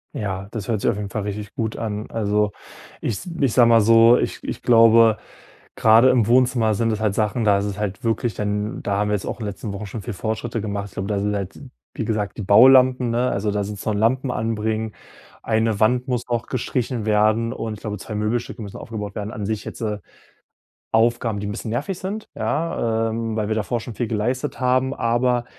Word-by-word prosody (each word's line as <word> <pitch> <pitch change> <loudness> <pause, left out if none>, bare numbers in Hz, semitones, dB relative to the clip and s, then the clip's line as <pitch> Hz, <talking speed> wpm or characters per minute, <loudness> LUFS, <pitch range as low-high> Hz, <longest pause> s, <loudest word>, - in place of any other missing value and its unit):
Ja, 95 -2 -4
das 105 -4 -5
hört 110 -4 -1
sich - - +2
auf 105 - -1
jeden 105 -1 -4
Fall 105 +2 -3
richtig 105 0 -5
gut 110 -1 -3
an. 105 -1 -4
Also, 105 -1 0 0.5
ich 105 - -2 0.2
ich 135 -5 +2
sage 120 -2 +6
mal 115 -1 +6
so, 115 +2 +6
ich - - -2
ich - - -5
glaube, 115 -1 +6 0.6
gerade 115 +3 +6
im 125 -5 +3
Wohnzimmer 120 -2 +3
sind 115 +2 +1
es 110 - -2
halt 110 -2 +1
Sachen, 110 +3 0
da 105 -2 +4
ist 100 - -2
es 100 -1 -4
halt 105 -1 -4
wirklich 115 0 0
dann 105 +2 -3
da 100 -1 -1
haben 105 +1 0
wir 105 - +2
jetzt 100 - -4
auch - - -5
in 110 - -4
den - - -2
letzten 100 +1 -7
Wochen 100 +2 -6
schon 105 +2 -6
viel 120 +2 -5
Fortschritte 110 +3 -3
gemacht. 100 -1 -5
Und 95 - -2
da 105 -1 -1
sind 105 +1 -1
halt, 100 -2 -5 0.3
wie - - -3
gesagt, 105 -2 -2
die - - -4
Baulampen, 125 +4 +6
ne? 120 +2 +1
Also, 105 +1 -1
da 105 0 -1
sind 105 +1 -5
es - - -9
noch 110 - 0
Lampen 125 +5 +1
anbringen. 110 -1 -2 0.5
Eine 110 -2 +1
Wand 125 +4 +2
muss 125 -2 -1
auch 120 -1 -2
gestrichen 125 -2 -2
werden 110 +2 +2
und 110 -3 -4
ich 105 - -13
glaube 105 -1 -5
2 105 +2 -7
Möbelstücke 115 +2 -2
müssen 100 -2 -8
aufgebaut 105 -2 -6
werden. 105 0 -4
An 105 - -5
sich 110 0 -2
jetzt, - - -8
äh, 105 -2 -2 0.9
Aufgaben, 115 -1 +2
die 105 - -4
'n - - -3
bisschen 105 +2 -5
nervig 145 - -3
sind 205 +4 -5
ja, 115 -8 -1
ähm, 115 0 -3
weil 105 -2 -1
wir 110 - 0
davor 110 +3 -1
schon 120 0 -8
viel 120 - -2
geleistet 125 +6 -2
haben, 130 +1 +2
aber 120 0 +1
110 Hz, 225 wpm, -22 LUFS, 105-120 Hz, 0.9 s, sage